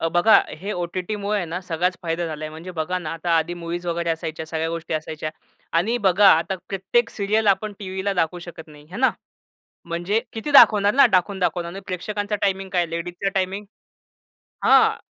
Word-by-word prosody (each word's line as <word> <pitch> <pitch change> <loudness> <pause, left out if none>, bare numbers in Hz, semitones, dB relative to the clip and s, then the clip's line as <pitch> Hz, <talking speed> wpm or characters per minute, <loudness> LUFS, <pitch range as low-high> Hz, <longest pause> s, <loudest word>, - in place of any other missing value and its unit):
अ, 165 - +1
बघा, 175 +6 +5 0.2
हे 200 +4 -4
ओ-टी-टीमुळे 195 +4 -2
हे - - -2
ना 170 +3 -4
सगळाच 180 0 -1
फायदा 170 0 -2
झालाय. 155 -1 -5
म्हणजे 160 +4 -9
बघा 175 +1 -2
ना, 165 -3 -5
आता 165 +1 -4
आधी 165 +2 0
मूव्हीज 175 +1 -4
वगैरे 170 0 -1
असायच्या 160 -1 -4
सगळ्या 160 0 -2
गोष्टी 165 -1 -4
असायच्या 155 0 -4 0.5
आणि 220 +8 +1
बघा, 195 +2 +6
आता 170 +4 -1
प्रत्येक 195 +5 0
सीरियल 210 +2 0
आपण 205 +2 +2
टीव्हीला 190 0 -3
दाखवू 165 +2 -1
शकत 160 -2 -10
नाही 150 -1 -15
आहे 185 - -7
ना. 260 - +5 0.7
म्हणजे 175 +6 -1
किती 225 +6 -5
दाखवणार 210 -7 +7
ना? 275 - +7
दाखवून, 190 +2 -1
दाखवून 180 -2 0
आणि 180 +3 -7
प्रेक्षकांचा 205 +3 -3
टाईमिंग 195 -1 0
काय? 175 -2 +1
लेडीजचा 175 +3 -3
टाईमिंग 195 +2 -1 1.0
हां. - - +5
180 Hz, 180 wpm, -23 LUFS, 165-200 Hz, 1.0 s, दाखवणार